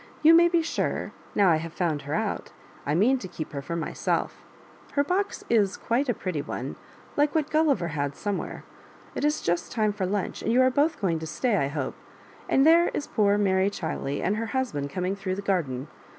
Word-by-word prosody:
You 320 +2 +8
may 340 +1 +7
be 340 -1 +2
sure, 325 - -2 0.2
now 200 -3 +5
I 160 - +4
have 165 +1 -6
found 160 -5 -1
her 150 - 0
out, 220 -1 -2 0.4
I 145 - +1
mean 250 +9 +4
to 190 - -6
keep 160 -3 -7
her 140 - -4
for 170 +5 -4
myself 170 - -2 0.5
Her 285 - +3
box 375 +7 -1
is 210 -4 +2
quite 250 +4 0
a 240 - +2
pretty 180 -7 -3
one, - - -5 0.4
like 290 +2 +2
what 305 -2 0
Gulliver 285 - +2
had 145 -2 -2
somewhere. 205 -2 -4 0.5
It - - -4
is 300 +1 +1
just 170 +1 -1
time 215 -3 +1
for 190 -3 -2
lunch, 200 0 -2
and 225 - 0
you 245 - +4
are 260 - +4
both 295 +5 +1
going 170 -6 0
to 160 - -6
stay, 205 +10 0
I 140 -8 +1
hope; 140 -2 -3 0.6
and 270 - +4
there 335 +2 +6
is 290 - -2
poor 205 -1 +2
Mary 190 -1 +2
Chiley 160 -7 -3
and 210 - +1
her 225 +1 -2
husband 235 - -2
coming 185 +2 -2
through 195 -1 -3
the 200 - -5
garden. 150 -9 -1
200 Hz, 210 wpm, -26 LUFS, 165-265 Hz, 0.6 s, You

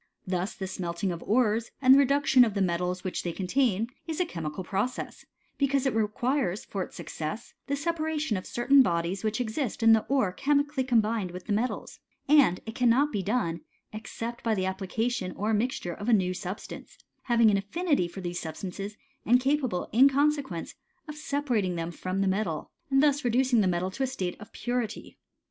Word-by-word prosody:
Thus 185 +1 -2
the 190 - -5
smelting 185 0 -3
of 170 - -5
ores, 225 0 +1
and 260 -1 +7
the 275 - +7
reduction 275 -1 +5
of 220 -4 0
the 200 - 0
metals 180 +1 -1
which 185 - -3
they 175 - -3
contain, 210 +3 +1 0.2
is 320 0 -3
a 360 - +2
chemical 165 - -5
process; 200 +8 -3 0.3
because 275 -1 +2
it 270 - +1
requires, 220 0 0
for 195 - -4
its - - -6
success, 155 +9 -6
the 280 - 0
separation 310 -4 -1
of 185 - -5
certain 270 +3 +4
bodies 175 -2 0
which 215 +1 -1
exist 235 0 -2
in 225 0 +8
the 220 -1 +3
ore 260 -9 +2
chemically 285 +5 +1
combined 225 -5 +1
with 180 +1 -9
the 210 - -1
metals; 230 +5 -2 0.3
and 275 -11 +5
it 225 - -6
cannot 250 +4 +3
be 205 - -1
done, 190 -5 -1 0.3
except 230 +2 -6
by 225 -2 +1
the 185 -2 -1
application 190 +1 -2
or 215 +2 -1
mixture 215 -5 -1
of 205 +5 -5
a - - +5
new 185 -3 +2
substance, 185 +2 -7 0.3
having 235 -3 +4
an 200 - +3
affinity 280 - 0
for 180 +3 -8
these 175 -1 -3
substances, 195 +5 -6 0.3
and 245 +3 +4
capable, 260 -8 0
in 260 +6 +6
consequence, 280 - 0 0.3
of 300 - -6
separating 270 -11 -1
them 165 0 -3
from 185 +3 -3
the 195 - +1
metal, 190 -5 -2 0.2
and 270 +1 +4
thus 290 -1 +3
reducing 245 -1 +3
the 195 - +2
metal 180 +1 0
to 270 - -7
a 265 - +2
state 190 -9 -3
of 210 - -11
purity. 240 -3 -4
220 Hz, 190 wpm, -28 LUFS, 185-265 Hz, 0.3 s, in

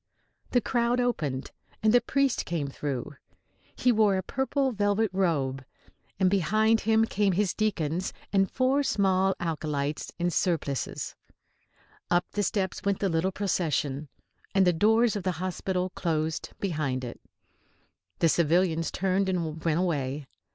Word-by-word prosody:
The 245 - +2
crowd 240 0 +1
opened, 150 - -1 0.3
and 215 0 +4
the 245 - +6
priest 275 +1 +1
came 165 -5 -1
through. 140 -1 -4 0.6
He 250 - +3
wore 210 -4 +3
a 185 - -2
purple 265 +4 0
velvet 205 -1 +1
robe, 140 -8 0 0.6
and 190 - +4
behind 215 +5 +3
him 220 +1 +3
came 205 -3 +1
his 195 +1 +1
deacons 185 -5 -1 0.2
and 195 -1 +3
four 265 +2 +2
small 195 -6 +2
acolytes 150 -3 -2
in 175 0 0
surplices. 155 -6 -1 0.9
Up 175 0 +3
the 205 - -1
steps 190 -1 -1
went 200 -1 +1
the 195 - 0
little 165 +3 +1
procession. 155 -7 -1 0.5
And 195 -1 +5
the 180 - +4
doors 220 +6 +3
of 205 - -2
the 185 0 -1
hospital 185 +1 -2
closed 160 -3 -2
behind 150 -9 -1
it. 120 - -7 1.0
The 165 - +3
civilians 165 0 +2
turned 190 +1 0
and 165 -4 -2
went 165 -2 +1
away. 145 -5 -1
185 Hz, 140 wpm, -28 LUFS, 160-210 Hz, 1.0 s, the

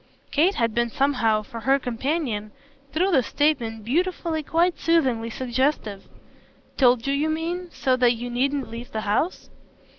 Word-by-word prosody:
Kate 345 +7 +3
had 230 -2 0
been 235 +1 +1
somehow, 230 -5 +1
for 230 +2 -8
her 270 +4 +3
companion, 245 -3 -2 0.4
through 365 +6 +1
this 265 -8 +3
statement, 235 -8 0
beautifully, 335 +3 0
quite 335 +4 +1
soothingly, 260 -9 +1
suggestive. 245 -4 -1 0.7
"Told 245 -3 +4
you, 275 - +1
you 295 +3 0
mean, 340 +3 -3
so 260 -1 +1
that 245 -1 +4
you 240 +1 -6
needn't 270 +2 -1
leave 235 +2 -8
the 220 - -3
house?" 215 - -1
260 Hz, 150 wpm, -24 LUFS, 230-315 Hz, 0.7 s, Told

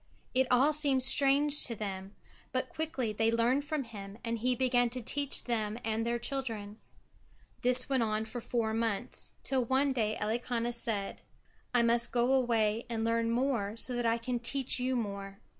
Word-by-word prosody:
It 260 0 +2
all 265 +5 +4
seemed 280 -4 +4
strange 280 +2 +6
to 235 - -4
them, 195 -2 -6 0.4
but - - -2
quickly 305 -9 -3
they 225 +2 +1
learned 240 +5 +1
from 300 -2 -2
him, 205 -3 -10
and 230 0 -2
he 250 +2 +1
began 245 -1 +2
to 250 +2 -4
teach 280 +4 +1
them 220 -3 -2
and 225 0 -1
their 235 +1 -1
children. 230 -5 -5 0.8
This 250 +1 +4
went 265 -2 +1
on 215 -1 -1
for 240 +2 -7
four 225 -2 -2
months, 225 -3 -2
till 265 -2 0
one 265 +3 +1
day 220 -4 -1
Elikana 235 +2 -2
said: 225 -4 -3 0.5
"I 245 -1 +3
must 235 0 +2
go 245 +2 +2
away 230 -3 +1
and 225 -1 -2
learn 230 0 0
more 230 -4 -1
so 250 - -2
that 240 -1 -1
I 230 0 +2
can 240 +1 -3
teach 260 +2 -1
you 255 +1 -1
more." 200 -4 -5
235 Hz, 175 wpm, -31 LUFS, 225-260 Hz, 0.8 s, strange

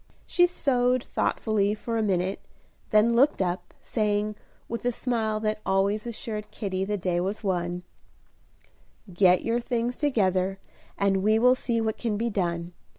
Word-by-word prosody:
She 355 0 +4
sewed 255 -7 +1
thoughtfully 210 -2 0
for 230 +2 -4
a 225 - +1
minute, 190 -2 0 0.5
then 215 +2 +4
looked 275 +5 +4
up, 180 -1 -2
saying, 210 -1 0 0.3
with 230 - -4
the 245 - +1
smile 225 -3 -1
that 215 0 -1
always 200 +3 +1
assured 215 -2 -5
Kitty 190 -3 -3
the 205 +1 -1
day 180 -2 0
was 195 +5 -3
won, 175 -2 -1 1.3
"Get 180 0 +4
your 230 +1 +1
things 240 0 -1
together, 195 -9 +1 0.4
and 195 -1 +2
we 215 +2 +3
will 250 +3 +6
see 240 -2 -1
what 220 -1 -1
can 225 -4 -1
be 230 +2 -1
done. 175 -3 -2
215 Hz, 150 wpm, -26 LUFS, 190-235 Hz, 1.3 s, will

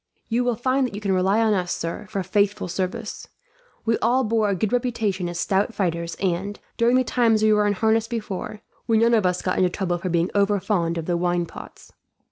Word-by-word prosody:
"You 240 +2 +1
will 245 -1 +1
find 255 +3 +1
that 220 - -9
you - - -4
can 200 -2 -1
rely 190 +4 +2
on 220 -1 +3
us, 180 -3 -1
sir, 170 +5 -4
for 200 -3 -2
faithful 200 +2 0
service. 185 +1 -4 0.6
We 225 0 +1
all 250 +3 +2
bore 220 -2 +1
a 200 - +1
good 210 +4 -1
reputation 220 -7 -1
as 175 0 -5
stout 200 +5 0
fighters 170 -4 -2
and, 195 +2 -2 0.2
during 235 +2 +3
the 255 - +4
time 235 -2 +2
we 215 0 +4
were 210 0 +3
in 205 - +2
harness 220 +3 +1
before, 215 -2 -5 0.3
we 225 -2 +3
none 230 +2 +4
of 215 -5 +3
us 180 0 -1
got 185 - -1
into 185 - +3
trouble 180 -1 -2
for 185 - -3
being 170 +1 +1
overfond 200 -4 +1
of 165 - -3
the 175 0 0
wine 175 0 0
pots." - - -12
205 Hz, 220 wpm, -23 LUFS, 180-225 Hz, 0.6 s, the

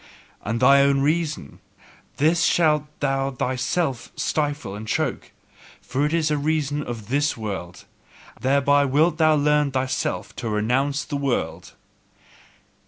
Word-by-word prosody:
"And 115 +2 -2
thine 140 +2 +6
own 140 -1 +2
reason 150 - -1 0.6
this 160 +4 +3
shalt 150 -3 +3 0.2
thou 135 -1 0
thyself 130 +2 -2
stifle 145 -9 -2
and 105 +2 -7
choke; - - -2 0.5
for 140 +3 -1
it - - -4
is 160 -2 +1
a 150 - +1
reason 150 -1 -1
of 115 -6 -7
this 145 +2 +1
world, 95 -5 -6 0.5
thereby 140 +2 +3
wilt 150 +4 +2
thou 155 -1 +5
learn 150 0 +2
thyself 130 0 -2
to 115 - -4
renounce 130 +7 0
the 145 - -3
world." 140 -3 -3
140 Hz, 130 wpm, -23 LUFS, 125-150 Hz, 0.6 s, thine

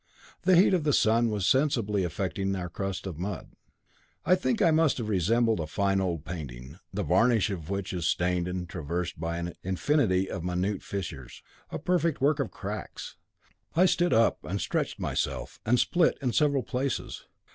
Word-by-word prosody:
The 185 - +4
heat 185 +3 +5
of 175 -4 +2
the 145 -1 +2
sun 115 +1 +3
was 105 -3 -1
sensibly 115 -8 +2
affecting 95 +2 -2
my 90 -2 -3
crust 95 +3 -4
of 85 -5 -6
mud. 95 -2 -5 0.7
I 180 - +5
think 185 +6 +1
I 165 - +4
must 155 -2 +3
have 115 -4 -3
resembled 110 +3 +2
a 80 - -3
fine 95 +3 +1
old 85 -5 -2
painting, 70 -2 -7
the 100 +1 -2
varnish 105 +6 +3
of 85 -5 -6
which 100 -1 -3
is 85 -2 -1
stained 90 0 +1
and 90 -1 -4
traversed 85 +1 -4
by 85 +1 -2
an 85 0 -4
infinity 95 - +1
of 85 - -5
minute 90 +3 -1
fissures, 100 -3 -6 0.3
a - - -4
perfect 170 -4 +1
network 145 +2 +2
of 140 - -1
cracks. 105 +1 -7 0.6
I 180 +3 +5
stood 175 -1 +2
up 115 +1 +3
and 100 +2 -3
stretched - - -2
myself, - - -3
and 125 +2 +4
split 175 -2 +2
in 125 -3 -1
several 140 -4 +2
places. 130 +1 -3
100 Hz, 180 wpm, -28 LUFS, 90-130 Hz, 0.7 s, heat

